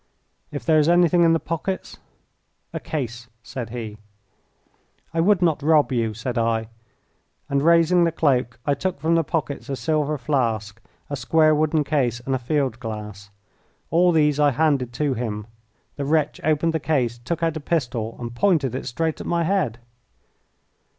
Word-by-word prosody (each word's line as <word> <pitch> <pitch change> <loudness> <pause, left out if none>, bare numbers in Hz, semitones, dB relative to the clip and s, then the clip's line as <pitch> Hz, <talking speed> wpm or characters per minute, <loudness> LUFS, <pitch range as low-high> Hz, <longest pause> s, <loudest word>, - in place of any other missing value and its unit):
"If 145 - -6
there 160 -2 +4
is 150 +2 +3
anything 175 0 +4
in 165 -1 +5
the 165 - +2
pockets 170 +4 -4 0.4
" - - -48 0.3
"A - - -3
case," 120 -5 -5 0.2
said 115 +2 -6
he. 110 -3 -6 1.1
"I 165 - -1
would 185 0 +3
not 160 -3 +2
rob 150 -1 +3
you," 115 -3 0
said 120 +2 -3
I; 115 -1 0 0.8
and 140 0 +1
raising 170 +2 +4
the 165 - +2
cloak 130 -7 +1
I 145 - +2
took 175 +3 -3
from 160 +3 +1
the 165 0 +3
pockets 150 -3 -3
a 135 - -1
silver 155 0 0
flask, 115 -6 -1 0.3
a - - 0
square 155 +2 +3
wooden 155 0 +2
case 130 -6 0
and 135 +2 -3
a 130 - 0
field 130 -2 -1
glass. 105 -3 -7 0.6
All 175 +2 +4
these 150 -3 +2
I 145 -1 +5
handed 140 -3 +1
to 145 +1 0
him. 110 -4 -4 0.5
The 140 - -2
wretch 155 0 0
opened 155 +2 +1
the 160 - 0
case, 130 -6 0
took 165 +8 -3
out 165 -1 +1
a - - -3
pistol, 120 -8 -2
and 120 -1 -5
pointed 150 -3 +2
it 130 - -4
straight 160 +6 -2
at - - -7
my 170 -1 +1
head. 160 - 0
145 Hz, 175 wpm, -23 LUFS, 120-160 Hz, 1.1 s, in